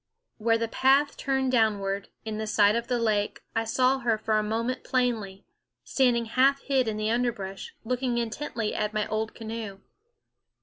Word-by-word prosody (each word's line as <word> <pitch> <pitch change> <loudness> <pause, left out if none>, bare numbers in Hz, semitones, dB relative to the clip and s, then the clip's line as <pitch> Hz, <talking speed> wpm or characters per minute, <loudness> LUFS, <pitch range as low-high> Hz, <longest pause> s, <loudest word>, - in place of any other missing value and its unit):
Where 225 +1 +3
the 230 0 -1
path 270 +5 +3
turned 265 -1 0
downward, 200 -4 +1 0.2
in 220 0 -3
sight 210 0 +4
of 235 0 -2
the 250 - 0
lake, 215 -3 0
I 225 0 +1
saw 255 +4 +2
her 235 -3 +1
for 215 0 +1
a - - +1
moment 230 +4 -2
plainly, 225 -7 -1 0.4
standing 245 -3 +2
half 265 +4 +3
hid 265 -3 +1
in 215 -1 -2
the 215 +1 0
underbrush, 225 -5 -2
looking 250 0 -1
intently 235 -1 -3
at 215 0 -2
my 215 - +1
old 220 0 -2
canoe. 220 -3 -6
225 Hz, 165 wpm, -27 LUFS, 215-250 Hz, 0.4 s, sight